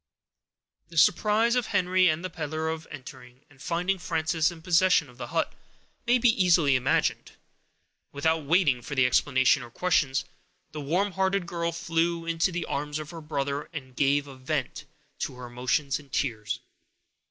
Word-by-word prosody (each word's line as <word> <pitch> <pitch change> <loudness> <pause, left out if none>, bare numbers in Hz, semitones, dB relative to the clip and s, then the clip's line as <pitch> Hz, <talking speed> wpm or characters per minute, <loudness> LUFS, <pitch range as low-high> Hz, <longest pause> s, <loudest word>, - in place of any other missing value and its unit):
The 170 - -10
surprise 215 +9 +4
of 250 -2 +1
Henry 185 -2 +3
and 165 +2 0
the - - -3
peddler, 160 0 -3
on 160 0 -5
entering 130 -2 -11
and 135 -2 -20
finding 180 +4 -1
Frances 160 -2 0
in 165 -2 -11
possession 180 -4 +3
of 125 - -21
the - - -5
hut, 160 +1 -1 0.5
may 245 +1 +5
be 245 0 +4
easily 165 -6 +4
imagined. 130 +1 0 0.8
Without 160 +2 0
waiting 145 -5 +3
for 140 +4 -6
explanations 130 +1 +3
or 120 - -10
questions, 145 -2 +1 0.5
the 155 -1 -6
warm 180 +8 0
hearted 190 0 0
girl 170 -1 -2
flew 170 0 -1
into 165 +2 +1
the 175 0 -3
arms 145 +1 -3
of 155 -1 -7
her 165 -1 -8
brother, 145 -1 -3
and 130 -5 -8
gave 140 +1 +2
a 140 -2 -11
vent 130 0 -3 0.3
to - - -3
her 125 0 -8
emotions 125 +3 -1
in 145 -1 -16
tears. 110 -6 -2
155 Hz, 165 wpm, -27 LUFS, 140-175 Hz, 0.8 s, may